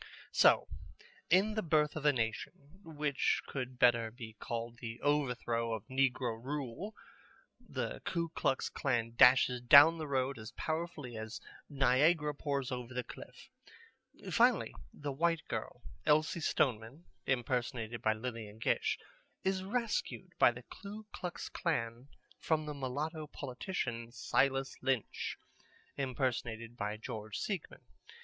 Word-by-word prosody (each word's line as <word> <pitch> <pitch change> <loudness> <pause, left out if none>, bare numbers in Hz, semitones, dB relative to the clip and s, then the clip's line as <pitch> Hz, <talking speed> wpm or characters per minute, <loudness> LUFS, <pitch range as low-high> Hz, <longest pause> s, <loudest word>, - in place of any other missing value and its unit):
So, - - +5 0.6
in 195 +5 +4
The 215 - 0
Birth 155 -4 +2
of 155 -1 -4
a - - +8
Nation, 140 - -4
which 150 -4 0
could 130 -2 -5
better 120 -2 +4
be 115 -1 -9
called 115 0 -4
The 115 -1 -6
Overthrow 125 -5 0
of 110 - -8
Negro 125 -3 0
Rule, 145 - -4 0.6
the - - -4
Ku 170 -2 -1
Klux 135 -4 0
Klan 120 -4 -1
dashes 125 0 +6
down 145 +7 +9
the 155 - -3
road 135 -2 0
as 110 0 -8
powerfully 155 -6 -3
as 110 0 -6 0.3
Niagara 145 +3 +3
pours 140 -3 -2
over 125 0 -5
the 125 - -1
cliff. - - -12 0.8
Finally - - +4 0.2
the 145 -1 -5
white 165 +3 0
girl - - -5 0.2
Elsie 155 +3 +3
Stoneman 130 +2 0 0.2
(impersonated 120 -2 -1
by 110 - +3
Lillian 110 -2 -6
Gish) 110 - +1 0.5
is 190 0 0
rescued 230 +3 -2
by - - +7
the - - -10
Ku 210 +2 -9
Klux 180 -1 -5
Klan 120 -6 -2 0.3
from 155 -1 +1
the 150 - -4
mulatto 150 +4 -3
politician, 125 -4 -4
Silas 135 +2 +1
Lynch 130 -3 -1 0.6
(impersonated 120 -4 -2
by 105 -1 -3
George 110 -2 -6
Seigmann). 195 -7 -4
130 Hz, 130 wpm, -34 LUFS, 120-150 Hz, 0.8 s, down